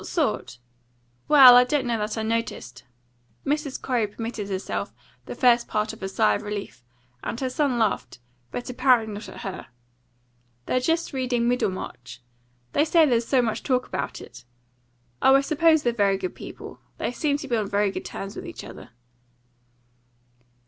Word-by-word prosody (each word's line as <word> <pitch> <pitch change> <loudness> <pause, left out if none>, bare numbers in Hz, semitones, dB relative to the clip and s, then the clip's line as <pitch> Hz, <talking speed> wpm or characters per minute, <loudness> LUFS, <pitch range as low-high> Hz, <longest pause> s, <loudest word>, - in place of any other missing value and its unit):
"What - - -9
sort? 125 - -1 0.7
Well, 265 -4 +9
I 245 - +8
don't 265 +1 0
know 235 -2 -1
that 210 +2 -3
I 220 - -1
noticed." 220 - -3 0.6
Mrs. 290 -1 -2
Corey 240 -5 0
permitted 220 -1 -6
herself 190 -1 -4 0.3
the - - -6
first 240 -2 +4
part 210 0 -1
of - - -13
a 190 - -3
sigh 105 - +2
of - - -2
relief; 205 -10 -6 0.4
and 230 - -4
her 260 -1 -2
son 280 -3 0
laughed, 220 - -1 0.3
but 245 - -6
apparently 245 -4 +2
not 210 +1 -8
at - - -10
her. 190 -1 -6 1.0
"They're 255 - +1
just 325 +5 -1
reading 250 -3 0
Middlemarch. 185 - -3 0.5
They 295 - +3
say 320 +1 +4
there's 235 -4 +1
so 260 -3 +3
much 225 -2 -2
talk 255 -2 0
about - - -4
it. - - -12 0.8
Oh, 265 - +6
I 275 - +5
suppose 315 +1 +3
they're 240 - +1
very 200 -3 +2
good 185 -1 -4
people. - - -10 0.2
They - - -2
seemed 285 +3 0
to 280 - -7
be 240 - 0
on 210 -3 -1
very 200 0 +1
good - - -6
terms 195 +1 -7
with - - -7
each - - -8
other." - - -11
235 Hz, 175 wpm, -25 LUFS, 205-265 Hz, 1.0 s, Well